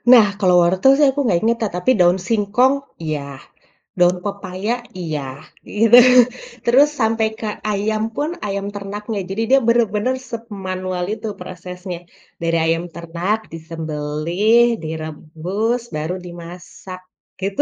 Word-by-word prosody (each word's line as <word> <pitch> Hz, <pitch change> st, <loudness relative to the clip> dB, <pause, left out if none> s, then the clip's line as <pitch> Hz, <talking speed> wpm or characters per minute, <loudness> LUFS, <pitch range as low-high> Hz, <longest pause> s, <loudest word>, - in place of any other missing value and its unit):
Nah, 230 Hz, -4 st, +9 dB
kalau 180 Hz, -2 st, +4 dB
wortel 185 Hz, +10 st, +4 dB
sih 295 Hz, -1 st, +5 dB
aku 285 Hz, +2 st, -3 dB
nggak 180 Hz, -7 st, +2 dB
ingat, 230 Hz, +1 st, +2 dB
ta 215 Hz, -, +1 dB
tapi 180 Hz, +8 st, +1 dB
daun 180 Hz, +1 st, +4 dB
singkong 230 Hz, +5 st, +3 dB, 0.3 s
iya, 155 Hz, -2 st, -2 dB, 0.8 s
daun 180 Hz, 0 st, +4 dB
pepaya 200 Hz, +2 st, -3 dB, 0.3 s
iya, 155 Hz, -4 st, -3 dB, 0.5 s
gitu, 225 Hz, +3 st, +4 dB, 0.7 s
terus 265 Hz, +5 st, +6 dB
sampai 225 Hz, 0 st, +2 dB
ke 220 Hz, -, -4 dB, 0.2 s
ayam 215 Hz, +2 st, -1 dB
pun, 295 Hz, +2 st, -1 dB, 0.2 s
ayam 200 Hz, 0 st, -3 dB
ternaknya. 205 Hz, +1 st, -5 dB
Jadi 205 Hz, +4 st, -2 dB
dia 270 Hz, +1 st, +6 dB
benar-benar 235 Hz, +1 st, +2 dB, 0.2 s
semanual 185 Hz, -5 st, -4 dB
itu 220 Hz, -, -6 dB
prosesnya. 180 Hz, 0 st, -7 dB, 0.4 s
Dari 165 Hz, 0 st, +1 dB
ayam 165 Hz, +1 st, +1 dB
ternak 170 Hz, +5 st, -2 dB, 0.2 s
disembelih, 165 Hz, +8 st, +1 dB
direbus, 160 Hz, +9 st, -3 dB
baru 155 Hz, +4 st, -2 dB
dimasak 175 Hz, +2 st, -10 dB, 0.4 s
gitu, 195 Hz, +1 st, 0 dB
195 Hz, 125 wpm, -20 LUFS, 170-225 Hz, 0.8 s, Nah